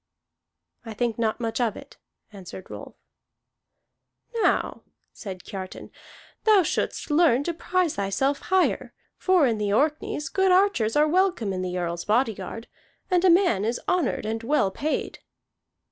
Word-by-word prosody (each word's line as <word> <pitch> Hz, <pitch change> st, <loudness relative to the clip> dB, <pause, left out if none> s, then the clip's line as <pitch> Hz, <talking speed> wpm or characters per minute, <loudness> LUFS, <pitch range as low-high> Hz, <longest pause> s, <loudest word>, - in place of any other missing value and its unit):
"I 225 Hz, -2 st, -8 dB
think 235 Hz, 0 st, -1 dB
not 220 Hz, 0 st, 0 dB
much 230 Hz, 0 st, -2 dB
of 230 Hz, -3 st, 0 dB
it," -, -, -13 dB, 0.4 s
answered 190 Hz, -1 st, -10 dB
Rolf. -, -, -9 dB, 1.5 s
"Now," -, -, +1 dB, 0.3 s
said 185 Hz, -4 st, -8 dB
Kiartan, 190 Hz, -3 st, -8 dB, 0.5 s
"thou 425 Hz, -4 st, +5 dB
shouldst 300 Hz, -, -2 dB
learn 295 Hz, -4 st, +4 dB
to 340 Hz, -, -2 dB
prize 360 Hz, 0 st, -1 dB
thyself 200 Hz, +9 st, 0 dB
higher. 375 Hz, 0 st, 0 dB, 0.2 s
For 370 Hz, -5 st, +4 dB
in 230 Hz, -4 st, 0 dB
the 205 Hz, -1 st, -1 dB
Orkneys 295 Hz, +4 st, 0 dB
good 380 Hz, -1 st, +2 dB
archers 365 Hz, -, +3 dB
are 300 Hz, +1 st, +4 dB
welcome 350 Hz, -, +1 dB
in 185 Hz, -, -3 dB
the 180 Hz, 0 st, -3 dB
Earl's 170 Hz, -1 st, -3 dB
body 225 Hz, +2 st, +2 dB
guard, 210 Hz, +4 st, -8 dB, 0.4 s
and 360 Hz, -1 st, +3 dB
a 375 Hz, -, +6 dB
man 340 Hz, -, +4 dB
is 230 Hz, +3 st, -1 dB
honored 345 Hz, -11 st, 0 dB
and 225 Hz, +1 st, -2 dB
well 235 Hz, -5 st, +1 dB
paid." 300 Hz, +9 st, -3 dB
245 Hz, 145 wpm, -25 LUFS, 210-340 Hz, 1.5 s, a